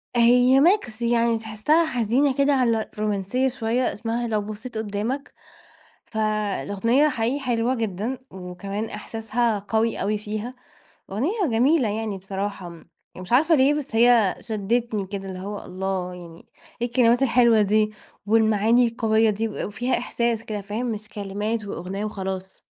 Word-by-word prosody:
هي 245 +3 +5
mix 335 - +2
يعني 235 -1 +2
تحسها 225 +10 +1
حزينة 255 0 +1
كده، 280 +1 +3
على 230 -5 +1
رومانسية 210 +5 0
شوية، 245 0 -1
إسمها 230 +2 -3
لو 215 -2 0
بصيت 215 +3 -7
قدامك. 220 +6 -3 0.7
فالأغنية 215 +4 +1
حقيقي 245 +1 -1
حلوة 245 -1 0
جدًا، 225 +2 -3
وكمان 190 +3 -5
احساسها 225 0 -2
قوي 220 +3 -1
أوي 210 +2 0
فيها، 215 +3 -5 0.6
أغنية 345 - 0
جميلة 250 +2 +3
يعني 215 -1 -3
بصراحة، 195 -1 -5
م 170 -1 -13 0.3
مش 185 +2 -9
عارفة 315 +6 +5
ليه 275 +1 +4
بس 295 -6 -4
هي 230 -4 +5
شدتني 220 -1 -1
كده 195 0 -6
اللي 185 -1 -6
هو 200 +2 -6
الله 185 0 -3
يعني، 170 -2 -12 0.4
إيه 240 - +1
الكلمات 240 0 +3
الحلوة 235 -3 +4
دي؟ 215 +1 +2 0.3
والمعاني 220 +2 +3
القوية 225 -1 +2
دي 215 +2 -1
و 215 - -4
وفيها 245 +5 -1
إحساس 235 -2 -1
كده 210 -2 -4
فاهم 210 +5 -4
مش 215 -1 -6
كلمات 210 +2 -3
وأغنية 195 +2 -5
وخلاص. 190 -2 -5
220 Hz, 140 wpm, -24 LUFS, 205-245 Hz, 0.7 s, هي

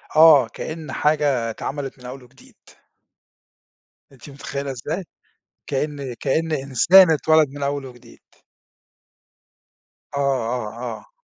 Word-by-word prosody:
آه، 155 -6 +7
كأِّن 155 +4 -7
حاجة 145 -6 +1
اتعمَلِت 135 +3 -6
من 125 - -14
أوّل 130 +1 -9
وجديد. 125 +2 -20 1.6
أنتِ 135 +1 -14
متخيلة 140 0 -6
إزاي؟ 155 +9 -5 0.6
كأني 140 -2 -3
كأني 155 0 -1
إنسان 165 +7 +6
أتولد 155 -1 +3
من 145 +1 -9
أول 140 -1 -2
وجديد. 120 -2 -15 2.0
آه، 140 - -3 0.4
آه، 115 +1 -6
آه. - - -23
140 Hz, 105 wpm, -21 LUFS, 130-155 Hz, 2.0 s, آه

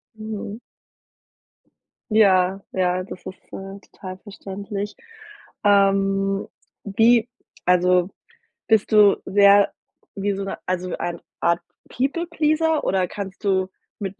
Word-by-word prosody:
Mhm. 215 0 -6 1.5
Ja 195 -3 +4
ja, 185 0 0
das 185 - -10
ist, 185 - -7 0.2
äh, 195 +1 -7
total 185 -2 -10
verständlich. 200 0 -6 0.7
Ähm, 195 -1 +2 0.4
wie 225 +3 +3 0.4
also, 180 0 +3 0.6
bist 220 -2 +2
du 210 -2 +6
sehr 200 +1 +5 0.4
wie 200 0 -1
so 195 0 -4
'ne 195 - -5
also, 180 -1 -2
eine 170 -1 -4 0.2
Art 170 0 +1 0.3
People 280 +7 -1
Pleaser 310 0 +1
oder 185 -1 +1
kannst 195 +2 -7
du 190 -2 +1 0.3
mit 195 -1 -5
195 Hz, 110 wpm, -22 LUFS, 185-210 Hz, 1.5 s, du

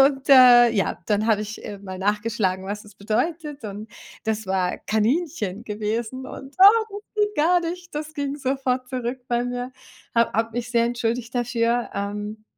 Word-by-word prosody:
Und, 270 0 +3
äh, 250 -3 +8
ja, 205 -4 -1
dann 210 0 +1
habe 215 -2 +3
ich, 215 +1 -8
äh, 205 -1 -6
mal 190 -1 -8
nachgeschlagen, 205 -2 0
was 205 +1 -4
das 210 -2 -16
bedeutet. 290 +8 -2
Und 210 +1 -7 0.4
das 220 0 -1
war 185 -1 0
Kaninchen 220 - -1
gewesen 220 +4 -3
und, 270 +2 -10
ah, 420 +4 +8 0.3
ging 420 0 +3
gar 345 +4 +4
nicht. 345 0 -6
Das 305 +1 -4
ging 285 -2 -2
sofort 260 -2 -1
zurück 250 0 -3
bei 240 0 +1
mir. 245 0 -4 0.5
Habe 230 0 +3
habe 225 +2 +1
mich 240 +1 -3
sehr 235 -1 +3
entschuldigt 235 0 -2
dafür, 240 0 0
ähm, 210 +2 -4
235 Hz, 165 wpm, -23 LUFS, 210-270 Hz, 0.5 s, äh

